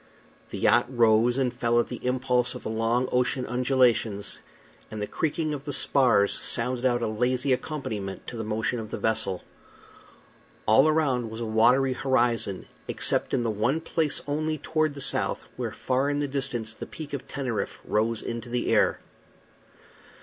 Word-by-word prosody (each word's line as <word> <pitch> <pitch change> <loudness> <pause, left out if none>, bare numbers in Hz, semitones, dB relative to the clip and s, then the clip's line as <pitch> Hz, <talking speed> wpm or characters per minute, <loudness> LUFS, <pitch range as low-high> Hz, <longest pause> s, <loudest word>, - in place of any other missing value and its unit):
The - - -5
yacht 120 +1 +4
rose 120 0 +3
and 130 -3 +1
fell 120 0 +1
at 120 - 0
the 125 - -6
impulse 125 -1 0
of - - -8
the - - -3
long 115 +3 +1
ocean 125 +1 +1
undulations, 125 -4 +1 0.5
and 110 - -6
the 105 - -1
creaking 155 +5 -1
of 140 -1 -6
the 145 - -2
spars 125 -8 +4
sounded 125 +1 -1
out 120 -1 0
a - - +1
lazy 125 +4 +1
accompaniment 110 -9 -4
to - - -7
the 115 - -4
motion 110 +2 -1
of 110 -1 -6
the - - -4
vessel. 110 -5 -1 1.2
All 130 +7 +6
around 135 -7 +1
was 110 +1 -7
a 120 - -3
watery 120 +4 +3
horizon, 120 -7 0 0.2
except - - -1
in 120 - +1
the 115 - 0
one 120 +9 0
place 160 -2 -1
only, 155 +2 -1
toward 155 0 0
the 140 - -5
south, - - +1
where - - -3
far 130 +2 0
in 145 0 0
the 145 - 0
distance 135 -5 -3
the - - -8
Peak 150 -3 -9
of 140 -1 -5
Teneriffe 130 -5 -3
rose 110 +1 0
into 115 0 -5
the 120 0 0
air. - - +3
125 Hz, 170 wpm, -26 LUFS, 115-135 Hz, 1.2 s, All